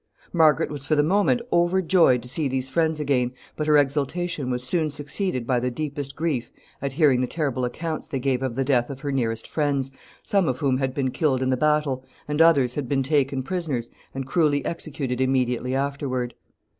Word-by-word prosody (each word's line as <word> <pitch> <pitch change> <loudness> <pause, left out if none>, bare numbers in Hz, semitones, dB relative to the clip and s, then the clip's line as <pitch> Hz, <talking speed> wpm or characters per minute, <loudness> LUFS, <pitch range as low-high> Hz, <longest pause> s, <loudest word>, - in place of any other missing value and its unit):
Margaret 160 -4 +4
was 145 -2 -3
for 155 +2 +1
the 145 - +4
moment 205 +8 +2
overjoyed 175 -7 +3
to - - -7
see 145 +4 -1
these 130 0 -2
friends 160 +1 +1
again, 130 -4 +1 0.2
but 150 - -2
her 150 -1 +6
exultation 145 +1 0
was 125 0 -2
soon 155 +4 0
succeeded 145 - -3
by 125 0 +1
the 125 +1 -1
deepest 140 +1 -4
grief 145 -6 -2 0.3
at 140 -1 -3
hearing 140 -4 +4
the 125 - 0
terrible 135 -4 -1
accounts 155 +6 -4
they 140 - -3
gave 130 -1 0
of 130 -3 -2
the 135 - +1
death 125 -3 +2
of 135 -1 -7
her 145 - -2
nearest 115 -4 -1
friends, 140 -3 -1 0.3
some 195 -4 +1
of 130 - 0
whom 130 -2 +1
had 130 -1 -2
been 130 -2 0
killed 130 -1 +1
in 130 - +1
the - - +3
battle, 150 -2 +1 0.2
and 150 +2 +1
others 140 -7 +5
had 135 -3 -4
been 135 -1 +1
taken 135 -1 +1
prisoners 140 -7 -3 0.2
and 135 -1 -3
cruelly 145 0 +1
executed 140 -6 -3
immediately 130 -1 +1
afterward. 135 -3 -2
140 Hz, 195 wpm, -24 LUFS, 130-155 Hz, 0.3 s, her